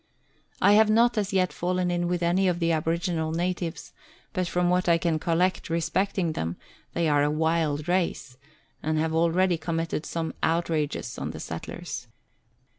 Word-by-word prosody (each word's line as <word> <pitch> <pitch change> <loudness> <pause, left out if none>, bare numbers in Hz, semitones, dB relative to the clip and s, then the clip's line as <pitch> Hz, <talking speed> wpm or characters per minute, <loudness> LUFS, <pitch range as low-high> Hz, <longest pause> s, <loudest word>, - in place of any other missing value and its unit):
I 200 - +7
have 215 +1 +6
not 235 +3 +4
as 205 -2 -1
yet 185 -2 +1
fallen 180 0 0
in 175 0 0
with 175 0 -1
any 180 +3 +2
of 180 -1 +1
the 170 -1 +1
aboriginal 165 0 0
natives, 175 0 -3 0.4
but 185 -3 -1
from 180 +1 +1
what 180 0 +2
I 170 - +5
can 165 -2 0
collect 175 +3 0
respecting 170 +2 0
them, 85 - -3 0.4
they 170 -1 +1
are 145 -1 +3
a 145 - +2
wild 155 -1 0
race, 170 -7 -1 0.5
and 155 0 0
have 160 +1 0
already 170 +2 +2
committed 165 -1 -2
some 165 -1 -3
outrages 160 -3 -1
on - - -3
the - - -7
settlers. - - -6
170 Hz, 165 wpm, -26 LUFS, 160-180 Hz, 0.5 s, I